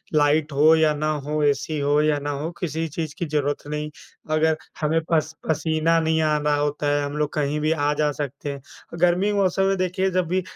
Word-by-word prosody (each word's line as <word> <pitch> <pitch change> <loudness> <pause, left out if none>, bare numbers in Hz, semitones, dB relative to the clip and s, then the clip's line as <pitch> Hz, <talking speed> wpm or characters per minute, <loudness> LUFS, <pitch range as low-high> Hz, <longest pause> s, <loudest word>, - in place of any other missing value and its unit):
Light 150 +1 +3
हो 150 +3 +5
या 160 -1 +3
ना 155 +1 -1 0.2
हो, 150 +1 -1
एसी 145 +2 0
हो 145 +1 +2
या 150 -1 +2
ना 145 +1 -4
हो, 145 +3 -3
किसी 165 -1 -2
चीज़ 155 -1 -5
की 175 - -2
ज़रूरत 145 -2 -2
नहीं। 150 0 -3 0.5
अगर 160 0 +3 0.3
हमें 155 +1 +2
पस 160 -1 +1
पसीना 160 +1 +1
नहीं 160 0 +1
आना 150 -1 +1
होता 145 0 -1
है, 145 - 0
हम 145 +1 -5
लोग 150 -1 -1
कहीं 150 0 -1
भी 155 +1 +1
आ 150 -2 +1
जा 150 0 +1
सकते 145 0 -5
हैं। 140 -1 -8 0.4
गर्मी 180 +4 +3
मौसम 195 -1 +1
में 195 - +2
देखिए 185 +1 0
जब 180 -2 0
भी 185 +2 0
155 Hz, 210 wpm, -23 LUFS, 145-160 Hz, 0.5 s, हो